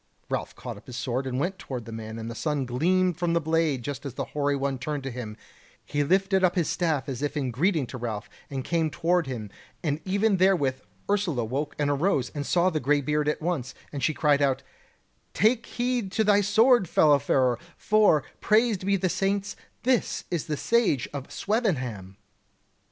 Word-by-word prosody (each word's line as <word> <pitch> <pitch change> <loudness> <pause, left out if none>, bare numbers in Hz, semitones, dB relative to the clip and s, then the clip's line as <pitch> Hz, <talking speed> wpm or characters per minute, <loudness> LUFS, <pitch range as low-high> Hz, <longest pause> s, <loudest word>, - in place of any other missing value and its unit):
Ralph - - -3
caught - - -7
up - - -16
his 125 - -8
sword 130 +1 -2
and 130 0 -2
went 185 +6 -2
toward 125 -4 -6
the 115 - -8
man, 110 0 -6
and 115 0 -5
the 115 - -5
sun 145 +1 -1
gleamed 175 +8 +1
from 175 -1 +1
the 170 - +3
blade 160 -5 0
just 145 +1 -5
as 135 -3 -6
the - - -2
hoary 145 -1 +1
one 135 -1 -2
turned 145 +1 -3
to 135 - -4
him; 115 -3 -6 0.5
he 145 0 0
lifted 190 +4 +2
up 180 0 +3
his 175 -4 +1
staff 155 -6 0
as 135 -2 -4
if 145 +1 -2
in 130 -4 -1
greeting 155 - +1
to 125 +1 -8
Ralph, 110 -3 -4 0.2
and 135 -2 -4
came 165 0 0
toward 175 0 +1
him, 110 -6 -5 0.3
and 150 -1 -1
even 200 +1 +2
therewith 165 -9 +2 0.3
Ursula 190 - +1
awoke 140 +6 -3
and 145 -1 +1
arose, 145 -3 +1
and 145 -2 -4
saw 180 +1 +3
the 155 - 0
greybeard 150 +2 +1
at 150 - -1
once; 150 -7 -2 0.2
and 140 - -4
she - - +3
cried 145 -2 +3
out: 135 -1 +1 0.7
"Take 225 +4 +3
heed 245 -5 -1
to 220 - +2
thy 205 -1 +4
sword, 220 0 +4
fellow 145 -2 +5
farer, 130 -3 +2 0.2
for, 210 -9 +4 0.2
praised 215 -3 +2
be 200 +1 +2
the 185 -1 +1
saints, 195 +2 -1 0.3
this 250 -1 +1
is 170 -4 -2
the 150 - -2
Sage 225 - +2
of 140 -2 -6
Swevenham!" 130 - -2
150 Hz, 195 wpm, -26 LUFS, 130-185 Hz, 0.7 s, fellow